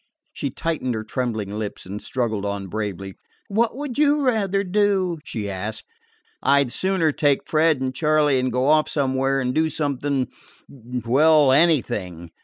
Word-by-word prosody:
She 140 - -3
tightened 145 -4 -2
her 110 - -4
trembling 110 -3 -3
lips 105 -2 -6
and 100 +3 -6
struggled 115 -5 -2
on 100 -1 -3
bravely. 100 -2 -4 0.4
"What 225 +4 +1
would 285 -2 -5
you 295 -1 +3
rather 200 -5 +1
do?" 190 -3 +1
she 105 -3 -5
asked. 105 +3 -5 0.6
"I 140 +1 +4
'd 125 - -7
sooner 185 -3 +1
take 145 -1 +1
Fred 155 -2 +2
and 130 0 -2
Charley 150 -1 +2
and 130 0 -1
go 125 +2 0
off 155 +1 +3
somewhere 135 -1 0
and 125 -1 -1
do 160 +2 +2
something 140 -3 -1 0.4
well, 130 +4 +2
anything." 105 - +1
135 Hz, 155 wpm, -22 LUFS, 110-160 Hz, 0.6 s, I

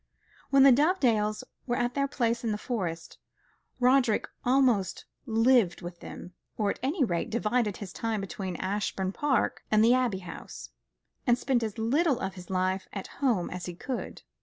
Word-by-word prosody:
When 275 -1 +6
the 275 - +9
Dovedales 240 - +2 0.2
were 240 - +1
at 245 0 0
their 275 +1 +1
place 235 -4 -1
in 225 - 0
the 210 - -1
Forest, 180 -9 -4 0.6
Roderick 250 -3 +3 0.2
almost 245 -8 +2 0.2
lived 225 -5 +3
with 175 0 -7
them; 180 - -9 0.2
or, 205 -2 +1
at - - -7
any 285 +3 +1
rate, 175 -8 -1
divided 220 -1 0
his 205 -5 -8
time 225 -2 -2
between 195 -2 -5
Ashbourne 190 0 -2
Park 275 +4 0
and 215 0 +4
the 240 - +6
Abbey 245 -7 +1
House, - - -9 0.6
and 240 0 +5
spent 250 -1 +1
as 220 -2 -3
little 265 +5 +2
of 190 -5 -3
his 180 -1 -11
life 185 0 0
at 195 - -5 0.2
home 230 -11 +1
as 180 0 -5
he 175 - -6
could. 255 +7 -5
225 Hz, 170 wpm, -28 LUFS, 190-255 Hz, 0.6 s, the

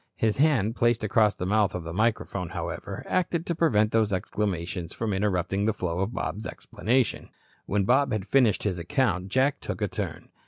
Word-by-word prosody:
His 110 -2 +1
hand, 130 -7 +3
placed 120 -2 +2
across 105 -1 +3
the 90 - -4
mouth 105 0 +2
of 90 - -4
the 85 0 -6
microphone, 105 -3 0
however, - - -5
acted 175 -2 0
to 170 - -1
prevent 110 -11 +2
these 110 -2 +2
exclamations 90 -3 -2
from 110 -3 -2
interrupting 95 0 0
the 110 - +2
flow 90 -3 -2
of 95 +4 -1
Bob's 105 -1 -4
explanation. 125 +2 -1 0.4
When 100 0 +1
Bob 130 +7 +3
had 105 -3 -1
finished 125 -7 +3
his 95 -4 -1
account, 95 - 0
Jack 130 +7 +1
took - - -5
a - - 0
turn. - - -5
105 Hz, 185 wpm, -27 LUFS, 95-120 Hz, 0.4 s, hand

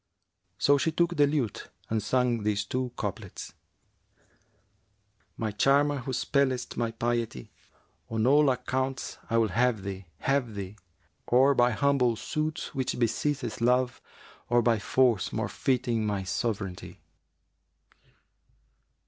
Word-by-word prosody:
So 140 +5 +4
she 160 - +1
took 170 +2 +1
the 145 -2 +4
lute 140 -7 -2 0.2
and 110 -1 -1
sang 125 +1 +1
these 105 -1 0
two 125 +3 -2
couplets, 105 -2 -5 1.8
'My 110 -2 -2
charmer 140 +7 +3
who 130 +1 -5
spellest 130 0 0
my 115 -1 0
piety[FN#365] 115 - -2 0.3
* - - -41
On 110 0 +1
all 145 +2 +5
accounts 130 +1 -2
I'll 115 -1 +2
have 115 0 +1
thee, 95 -1 -6
have 135 -5 0
thee, 100 0 -6 0.5
Or 130 +3 +5
by 120 -2 +4
humble 125 -1 +2
suit 155 +6 -3
which 130 -3 -2
besitteth 120 0 -1
Love 125 +1 +2 0.2
* - - -24
Or 120 0 +3
by 115 -2 +3
force 120 -1 +2
more - - -2
fitting 120 -4 0
my 100 -2 -1
sovranty.' 100 -1 -3
120 Hz, 125 wpm, -28 LUFS, 110-135 Hz, 1.8 s, all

